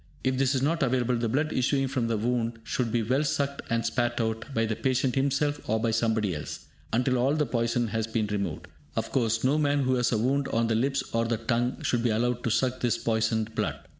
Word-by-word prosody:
If 130 Hz, 0 st, +1 dB
this 135 Hz, 0 st, +2 dB
is 130 Hz, -, 0 dB
not 165 Hz, +4 st, +1 dB
available, 125 Hz, -2 st, +1 dB
the 115 Hz, -1 st, -1 dB
blood 150 Hz, +6 st, 0 dB
issuing 135 Hz, +2 st, +1 dB
from 130 Hz, -3 st, -1 dB
the 115 Hz, -1 st, 0 dB
wound 115 Hz, +1 st, -1 dB
should 120 Hz, -1 st, -1 dB
be 115 Hz, -1 st, +1 dB
well 130 Hz, +7 st, +1 dB
sucked 140 Hz, -1 st, -1 dB
and 115 Hz, 0 st, 0 dB
spat 120 Hz, 0 st, 0 dB
out, 110 Hz, +2 st, -2 dB
by 115 Hz, -3 st, +1 dB
the 110 Hz, -1 st, -1 dB
patient 130 Hz, +1 st, +1 dB
himself 140 Hz, +2 st, +1 dB
or 110 Hz, +1 st, +2 dB
by 115 Hz, +1 st, +1 dB
somebody 110 Hz, -3 st, +1 dB
else, 75 Hz, -, -6 dB, 0.3 s
until 125 Hz, +2 st, +2 dB
all 135 Hz, +4 st, +2 dB
the 150 Hz, -1 st, +1 dB
poison 115 Hz, -1 st, 0 dB
has 110 Hz, +1 st, -1 dB
been 115 Hz, -1 st, 0 dB
removed. 100 Hz, -6 st, -3 dB, 0.3 s
Of -, -, -2 dB
course, 115 Hz, -3 st, +1 dB
no 140 Hz, +4 st, +3 dB
man 145 Hz, -1 st, +2 dB
who 130 Hz, 0 st, +2 dB
has 125 Hz, 0 st, +1 dB
a 115 Hz, -, +2 dB
wound 135 Hz, +5 st, +1 dB
on 115 Hz, +1 st, +1 dB
the 115 Hz, -, +1 dB
lips 135 Hz, +5 st, +1 dB
or 115 Hz, 0 st, +2 dB
the 115 Hz, 0 st, 0 dB
tongue 120 Hz, +2 st, -1 dB
should 120 Hz, -, +1 dB
be 120 Hz, -, +1 dB
allowed 120 Hz, +2 st, 0 dB
to -, -, +1 dB
suck 130 Hz, +3 st, +1 dB
this 120 Hz, -2 st, +1 dB
poisoned 110 Hz, -1 st, 0 dB
blood. -, -, -2 dB
120 Hz, 235 wpm, -27 LUFS, 115-130 Hz, 0.3 s, no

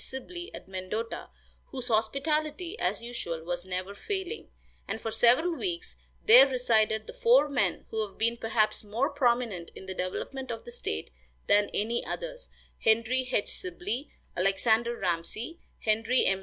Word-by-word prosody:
Sibley, 345 Hz, -, -6 dB
at -, -, -10 dB
Mendota, 190 Hz, +5 st, -4 dB, 0.4 s
whose 255 Hz, -3 st, -5 dB
hospitality, 300 Hz, -, 0 dB
as -, -, 0 dB
usual, 175 Hz, -9 st, -4 dB
was 175 Hz, +1 st, -3 dB
never 185 Hz, +2 st, -3 dB
failing, 385 Hz, -, -4 dB, 0.4 s
and 220 Hz, -, -3 dB
for 225 Hz, -, -3 dB
several 250 Hz, +10 st, +4 dB
weeks 345 Hz, 0 st, -3 dB, 0.3 s
there 465 Hz, -2 st, +10 dB
resided 220 Hz, -4 st, +2 dB
the -, -, -9 dB
four -, -, +5 dB
men 280 Hz, -3 st, 0 dB
who 220 Hz, -1 st, 0 dB
have 195 Hz, -, -19 dB
been 230 Hz, +1 st, +2 dB
perhaps 225 Hz, -2 st, +1 dB
more 230 Hz, +8 st, 0 dB
prominent 240 Hz, -, +1 dB
in -, -, -9 dB
the 190 Hz, -, -4 dB
development 260 Hz, +9 st, -4 dB
of 230 Hz, -1 st, -5 dB
the 480 Hz, -, -8 dB
state 485 Hz, -, -4 dB, 0.3 s
than 205 Hz, 0 st, +4 dB
any 230 Hz, +3 st, 0 dB
others, -, -, -5 dB, 0.3 s
Henry 230 Hz, +3 st, +2 dB
H. 205 Hz, -, +1 dB
Sibley, 205 Hz, -, -4 dB, 0.3 s
Alexander 220 Hz, +5 st, +2 dB
Ramsey, 195 Hz, -, -2 dB, 0.2 s
Henry 225 Hz, +3 st, +2 dB
M. 195 Hz, 0 st, +2 dB
235 Hz, 150 wpm, -29 LUFS, 205-280 Hz, 0.4 s, there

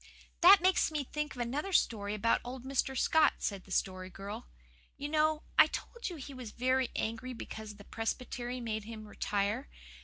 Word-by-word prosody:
"That 380 Hz, +2 st, +9 dB
makes 370 Hz, 0 st, +4 dB
me 305 Hz, -2 st, -2 dB
think 300 Hz, +2 st, -4 dB
of 245 Hz, -, -4 dB
another 280 Hz, +11 st, -2 dB
story 210 Hz, -, +2 dB
about 225 Hz, +2 st, +2 dB
old 250 Hz, +1 st, -7 dB
Mr. 265 Hz, 0 st, 0 dB
Scott," 315 Hz, +3 st, +4 dB
said 200 Hz, -3 st, -3 dB
the 190 Hz, -, -14 dB
Story 185 Hz, 0 st, -1 dB
Girl. 195 Hz, -, -7 dB, 0.5 s
"You 285 Hz, -, -3 dB
know, 310 Hz, 0 st, +2 dB, 0.2 s
I -, -, +10 dB
told 475 Hz, -3 st, -5 dB
you 350 Hz, -, -6 dB
he 280 Hz, -2 st, -8 dB
was 255 Hz, -4 st, -7 dB
very 255 Hz, +2 st, +1 dB
angry 230 Hz, +3 st, -2 dB
because 220 Hz, -2 st, -7 dB
the 205 Hz, -, -13 dB
Presbytery 245 Hz, +3 st, -3 dB
made 220 Hz, -3 st, -3 dB
him 220 Hz, -1 st, -8 dB
retire. 210 Hz, +6 st, -1 dB
245 Hz, 180 wpm, -32 LUFS, 215-290 Hz, 0.5 s, I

